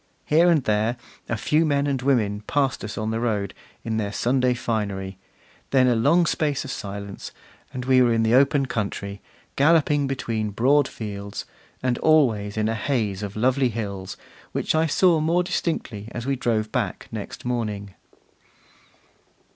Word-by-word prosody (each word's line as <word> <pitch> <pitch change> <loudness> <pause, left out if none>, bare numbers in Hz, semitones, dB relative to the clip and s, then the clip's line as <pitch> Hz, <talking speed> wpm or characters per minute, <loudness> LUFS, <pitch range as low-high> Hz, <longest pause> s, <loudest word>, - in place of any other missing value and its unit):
Here 165 +4 +4
and 160 -5 +3
there, 110 +2 +1 0.3
a 115 - 0
few 150 +8 +2
men 145 -2 +1
and 140 -3 -1
women 110 -7 +1
passed 140 -3 0
us 105 - -6
on 110 0 -2
the 110 - -1
road, 105 -5 -1 0.3
in 110 -1 -2
their 105 -2 -2
Sunday 125 +2 +1
finery; 100 -5 -3 0.5
then 130 -2 +4
a 125 - +4
long 150 +10 +4
space 150 -4 0
of 135 - -5
silence, 100 -2 -6 0.4
and 125 -1 -5
we 130 0 +5
were 120 -1 +4
in 115 -1 +2
the 110 +1 +2
open 140 +1 +4
country, 100 -4 -4 0.3
galloping 145 -1 +3
between 115 -5 -2
broad 130 +7 +3
fields; 100 -2 -6 0.4
and 125 -1 0
always 110 -10 +3
in 110 0 +1
a 110 - 0
haze 110 -4 -1
of 105 -1 -5
lovely 130 +3 +2
hills, 100 -4 -5 0.4
which - - 0
I 160 +1 +2
saw 170 +1 +4
more 165 +3 +2
distinctly 145 - -3
as 120 - -5
we 135 0 0
drove 110 -4 -1
back - - -2
next - - -7
morning. 105 -5 -3
120 Hz, 165 wpm, -24 LUFS, 105-140 Hz, 0.5 s, we